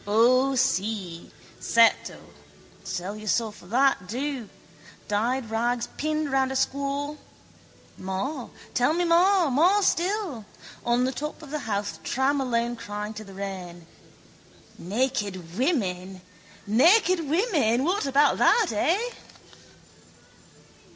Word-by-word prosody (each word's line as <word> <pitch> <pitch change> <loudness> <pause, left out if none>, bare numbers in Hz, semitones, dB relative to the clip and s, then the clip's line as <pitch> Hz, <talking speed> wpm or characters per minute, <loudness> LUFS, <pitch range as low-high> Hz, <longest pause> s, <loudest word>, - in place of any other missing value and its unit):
O 255 +5 +4
si, 205 -8 -1 0.3
certo! 230 0 +3 0.7
Sell 185 +2 -4
your 215 0 -9
soul 225 +2 +1
for 190 -4 -16
that, 245 -4 +2
do, 255 0 -4 0.6
dyed 230 +3 -1
rags 235 +2 -1
pinned 310 -1 -2
round 265 -1 +1
a - - -3
squaw. 280 +2 -1 0.8
More 235 +9 -4 0.2
tell 250 +6 +2
me, 355 - +1
more 350 +1 +4
still! 365 - 0 0.4
On 240 +1 +2
the 260 - +1
top 300 +4 -6
of 285 - -11
the 305 - -2
Howth 200 -5 -3
tram 265 - 0
alone 240 -2 -1
crying 210 -1 -6
to 215 0 -8
the 195 -2 -13
rain: 185 -3 -7 0.9
Naked 200 -5 -2
women! 190 - -1 0.4
Naked 350 - +4
women! 305 - +2
What 360 0 0
about 280 +2 +3
that, 450 -5 +4
eh? 325 - +1
250 Hz, 115 wpm, -25 LUFS, 205-290 Hz, 0.9 s, O